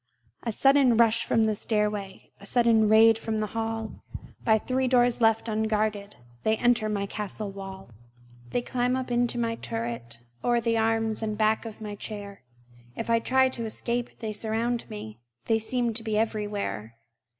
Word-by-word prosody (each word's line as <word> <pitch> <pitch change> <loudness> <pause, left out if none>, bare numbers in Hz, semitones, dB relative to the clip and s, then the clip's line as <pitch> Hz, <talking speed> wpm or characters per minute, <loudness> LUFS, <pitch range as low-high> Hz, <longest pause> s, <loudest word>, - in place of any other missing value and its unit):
A 230 - -2
sudden 270 0 +4
rush 230 0 +4
from 225 - +2
the 220 0 +2
stairway, 210 -2 -2
A 200 - -13
sudden 230 -3 +4
raid 225 +1 +6
from 220 -1 -2
the 215 - 0
hall! 225 -1 -4 0.4
By 220 -1 +4
three 255 +4 -1
doors 245 -1 +3
left 225 0 +3
unguarded 215 -2 -1 0.3
They 220 0 +2
enter 240 -2 +2
my 200 -1 -1
castle 210 0 -4
wall! 195 -6 -9 0.6
They 240 - -1
climb 250 0 0
up 260 -1 -3
into 240 0 +1
my 230 -1 -1
turret 115 0 -5 0.3
O'er 240 -1 +3
the 230 0 0
arms 225 -1 +1
and 215 -1 -2
back 220 +1 +2
of 225 -1 -8
my 210 -1 -5
chair; 205 -1 -7 0.5
If 230 - -3
I 230 - +4
try 260 +3 +3
to 235 -3 -4
escape, 235 +2 -3
they 220 -2 -3
surround 225 +3 -1
me; 115 - -8 0.3
They 225 0 +2
seem 235 +1 -1
to 225 - -4
be 220 -1 -1
everywhere. 205 - -2
220 Hz, 170 wpm, -27 LUFS, 210-235 Hz, 0.6 s, raid